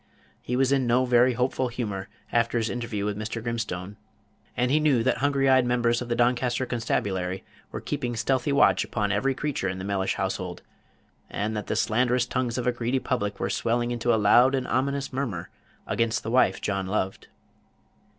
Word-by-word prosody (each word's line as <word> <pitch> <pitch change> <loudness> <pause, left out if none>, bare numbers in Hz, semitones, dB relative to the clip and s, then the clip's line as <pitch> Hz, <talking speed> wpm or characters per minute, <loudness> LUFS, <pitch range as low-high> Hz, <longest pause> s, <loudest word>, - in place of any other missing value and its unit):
He 125 - -3
was 135 +1 +2
in 135 -3 +2
no 125 +2 +3
very 125 0 +4
hopeful 125 +1 0
humor, 105 -6 -4 0.2
after 120 0 +1
his 115 -1 0
interview 115 -4 -3
with 105 -1 -1
Mr. 110 +2 -4
Grimstone, 105 -5 -4 0.6
and 125 +1 +1
he 150 - +4
knew 145 -7 +3
that 130 - +1
hungry 140 0 +2
eyed 130 -1 +5
members 120 -1 +1
of 120 - -6
the 120 - +1
Doncaster 120 +1 +1
constabulary 95 -6 -2 0.3
were - - -5
keeping 120 -1 -3
stealthy 130 +4 0
watch 140 - +4
upon 105 -2 -1
every 130 +7 +1
creature 140 -9 -2
in 95 - -4
the 95 - -6
Mellish 100 -1 -1
household, 95 -2 -3 0.7
and 110 +2 -2
that 105 - -4
the - - -1
slanderous 125 +2 +2
tongues 125 -1 -2
of 125 - -2
a 125 - +3
greedy 120 +2 -1
public 120 -5 -2
were - - 0
swelling 120 +1 0
into 120 0 0
a 115 - +4
loud 120 +6 +5
and 130 -1 -2
ominous 140 +1 -1
murmur 115 -11 -3 0.3
against 115 -1 0
the 110 - -4
wife 120 -6 +3
John 100 -2 -2
loved. 95 -1 -2
120 Hz, 190 wpm, -26 LUFS, 105-125 Hz, 0.7 s, eyed